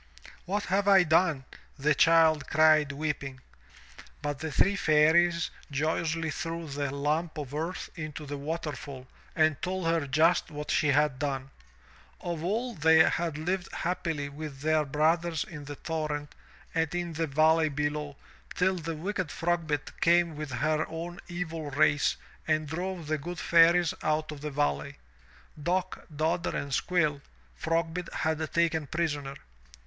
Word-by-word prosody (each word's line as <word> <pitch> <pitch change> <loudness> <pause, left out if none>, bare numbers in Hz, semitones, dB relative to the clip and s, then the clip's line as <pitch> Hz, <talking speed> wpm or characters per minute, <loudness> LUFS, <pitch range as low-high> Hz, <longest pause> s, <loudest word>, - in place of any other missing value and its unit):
"What 205 +3 -1
have 195 +2 0
I 195 -2 +7
done? 160 -4 +2 0.3
the 150 +2 +2
child 160 0 +4
cried 155 -1 +5
weeping. 140 -2 -4 0.8
But 145 -2 -2
the 160 -1 -4
three 195 +9 +3
Fairies 165 +1 +3 0.2
joyously 160 +2 -1
threw 165 +1 -4
the 140 0 -3
lump 150 +4 -1
of 145 -3 -6
earth 165 +5 -4
into 155 -2 -6
the 145 0 -5
waterfall 145 -3 -5 0.3
and 155 -2 +2
told 185 -1 -2
her 165 -3 +1
just 160 +7 +3
what 150 -1 -5
she 150 - +2
had 145 -2 +2
done. 135 -2 -3 0.7
Of 170 -2 -4
old 220 - -2
they 160 0 +6
had 165 -3 -1
lived 175 +3 -2
happily 165 -4 -2
with 145 -1 -8
their 155 0 +2
brothers 160 +3 +1
in 150 -3 -9
the 145 0 -7
torrent 150 -2 -4 0.4
and 160 0 0
in 175 -1 -2
the 160 +1 -1
valley 155 +2 +3
below 145 0 -2 0.4
till 185 0 +2
the 165 -1 -4
wicked 185 +1 -3
Frogbit 165 -2 -1
came 170 -1 +4
with 150 -1 -5
her 155 +5 +1
own 170 +3 -6
evil 165 -4 -4
race 145 +1 +2 0.3
and 155 -1 +1
drove 175 +2 -4
the 155 0 -1
good 175 +5 -6
Fairies 170 0 +5
out 155 0 0
of 145 -2 -8
the 150 - -3
valley. 75 - -1 0.6
Dock, 185 +4 -2
Dodder 160 +3 -1
and 140 -1 -4
Squill, 155 -3 +1 0.3
Frogbit 165 - -2
had 160 0 -1
taken 160 -3 +1
prisoner. 145 -4 -2
155 Hz, 145 wpm, -29 LUFS, 145-170 Hz, 0.8 s, I